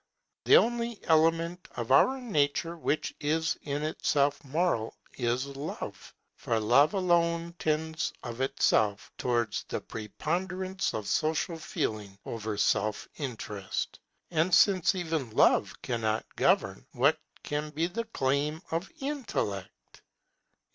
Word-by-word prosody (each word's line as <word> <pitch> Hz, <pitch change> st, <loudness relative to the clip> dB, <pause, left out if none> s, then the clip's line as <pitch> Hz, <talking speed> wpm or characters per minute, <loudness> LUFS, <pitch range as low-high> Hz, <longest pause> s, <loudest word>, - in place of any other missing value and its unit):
The -, -, +8 dB
only 235 Hz, -1 st, +1 dB
element 165 Hz, +2 st, +2 dB
of 120 Hz, +1 st, -3 dB
our 265 Hz, -, +5 dB
nature 165 Hz, -, 0 dB
which 155 Hz, -2 st, -1 dB
is 160 Hz, +3 st, +1 dB
in 145 Hz, 0 st, -3 dB
itself 145 Hz, -2 st, +1 dB
moral 140 Hz, -5 st, 0 dB, 0.2 s
is 125 Hz, +1 st, 0 dB
Love; 140 Hz, +2 st, -7 dB, 0.2 s
for 115 Hz, -, 0 dB
Love 125 Hz, -, +4 dB
alone 170 Hz, -2 st, +2 dB
tends 160 Hz, +1 st, -1 dB
of 120 Hz, 0 st, -5 dB
itself 105 Hz, -5 st, +1 dB
towards 120 Hz, -4 st, 0 dB
the -, -, -3 dB
preponderance 185 Hz, -, -3 dB
of 110 Hz, -, -3 dB
social 160 Hz, +2 st, 0 dB
feeling 105 Hz, -9 st, -3 dB
over 110 Hz, -2 st, -4 dB
self 105 Hz, +1 st, +1 dB
interest. 110 Hz, -8 st, -4 dB, 0.3 s
And 165 Hz, +2 st, +3 dB
since 190 Hz, -1 st, +4 dB
even 160 Hz, -8 st, -2 dB
Love -, -, +4 dB
cannot 110 Hz, -2 st, -1 dB
govern, -, -, +2 dB
what -, -, +3 dB, 0.2 s
can 150 Hz, +1 st, -2 dB
be 155 Hz, +2 st, -1 dB
the 230 Hz, +7 st, -3 dB
claim 150 Hz, -3 st, -1 dB
of 165 Hz, +3 st, -2 dB
Intellect? 215 Hz, -, -4 dB
155 Hz, 120 wpm, -29 LUFS, 120-170 Hz, 0.3 s, The